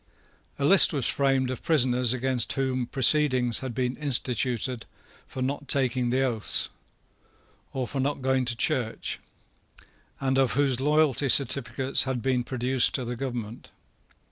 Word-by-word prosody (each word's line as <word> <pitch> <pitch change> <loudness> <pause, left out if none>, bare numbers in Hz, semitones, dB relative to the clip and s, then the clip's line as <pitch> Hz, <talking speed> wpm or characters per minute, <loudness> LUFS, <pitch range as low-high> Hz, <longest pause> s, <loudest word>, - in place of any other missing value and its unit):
A 140 - -2
list 190 +3 +6
was 135 -5 0
framed 135 -2 +1
of 130 - -6
prisoners 125 -6 +2
against 130 -1 -1
whom 130 -2 -2
proceedings 130 -3 +2
had 130 -3 -7
been 125 0 -2
instituted 125 -3 -1 0.4
for 130 - -5
not 140 +2 -4
taking 125 -2 +1
the 130 +2 +1
oaths, 115 -5 -1 1.0
or 130 -1 -3
for 135 - -5
not 135 0 -2
going 130 0 +1
to 120 -1 -1
church, 115 -1 -2 1.0
and 135 0 0
of 130 -2 +1
whose 135 -2 +1
loyalty 145 -1 +1
certificates 135 0 +2
had 130 -3 -3
been 130 -2 0
produced 130 0 0
to 130 - -3
the 120 +1 -5
government. 120 -3 -6
130 Hz, 140 wpm, -26 LUFS, 125-135 Hz, 1.0 s, list